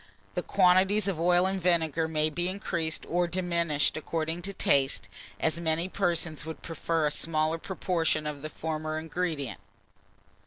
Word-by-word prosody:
The - - -1
quantities 190 +2 +4
of 185 -5 -1
oil 175 +1 +4
and 190 0 -1
vinegar 165 -2 +2
may 155 -1 +1
be 175 +3 -1
increased 170 -4 -2
or 175 +1 +1
diminished 170 -4 +1
according 160 +2 -2
to 195 +3 -3
taste, 135 -7 +2 0.3
as 160 +1 0
many 165 +1 0
persons 170 -5 0
would 160 +1 -7
prefer 165 0 -1
a 150 - +2
smaller 155 +1 0
proportion 170 -4 0
of 150 -2 -4
the 155 - -5
former 155 0 -3
ingredient. 160 -4 -3
165 Hz, 150 wpm, -29 LUFS, 155-180 Hz, 0.3 s, quantities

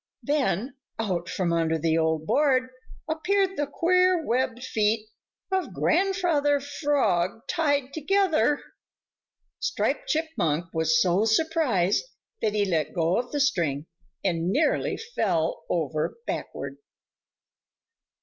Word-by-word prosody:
Then 270 - 0 0.2
out 180 -6 -2
from 175 -3 -1
under 165 -1 +1
the 160 0 +1
old 160 -1 +1
board 260 - +2 0.4
appeared 380 +5 +1
the 290 0 -1
queer 365 +2 +2
webbed 250 0 0
feet 215 -2 0 0.4
of 380 -1 -1
Grandfather 345 -7 +2
Frog 275 - 0
tied 285 -5 0
together. 320 -2 +2 1.0
Striped - - -1
Chipmunk 180 - -1
was 160 0 +2
so 185 +4 +3
surprised 225 - +2 0.4
that 215 - +1
he 205 -1 +2
let 165 -4 -1
go 170 +1 +2
of 245 0 -5
the 290 - -1
string 165 - +1 0.4
and 170 -2 0
nearly 295 +9 +1
fell 180 - -1
over 155 - -1
backward. - - -5
245 Hz, 110 wpm, -26 LUFS, -, 1.0 s, so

